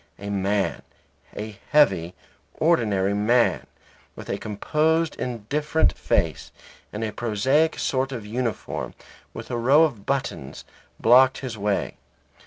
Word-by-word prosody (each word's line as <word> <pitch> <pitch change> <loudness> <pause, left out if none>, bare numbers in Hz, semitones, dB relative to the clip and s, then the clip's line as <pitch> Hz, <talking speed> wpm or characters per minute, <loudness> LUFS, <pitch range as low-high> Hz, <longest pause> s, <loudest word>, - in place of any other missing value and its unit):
A 100 +1 -6
man, 100 0 0 0.6
a 105 -1 -6
heavy, 90 - +3 0.4
ordinary 105 - +2
man, 115 +4 +2 0.5
with - - -10
a - - -2
composed 155 +9 0
indifferent 125 - 0
face, - - -1 0.4
and 105 +2 -4
a 110 - -2
prosaic 130 +9 +1
sort 135 0 -1
of 115 -5 -6
uniform, 115 0 -4 0.4
with - - -9
a 120 - -1
row 135 +7 +5
of 120 -11 -2
buttons, 135 - -3 0.3
blocked 130 +3 +5
his 130 -4 -5
way. 105 -1 -2
120 Hz, 120 wpm, -24 LUFS, 105-140 Hz, 0.6 s, row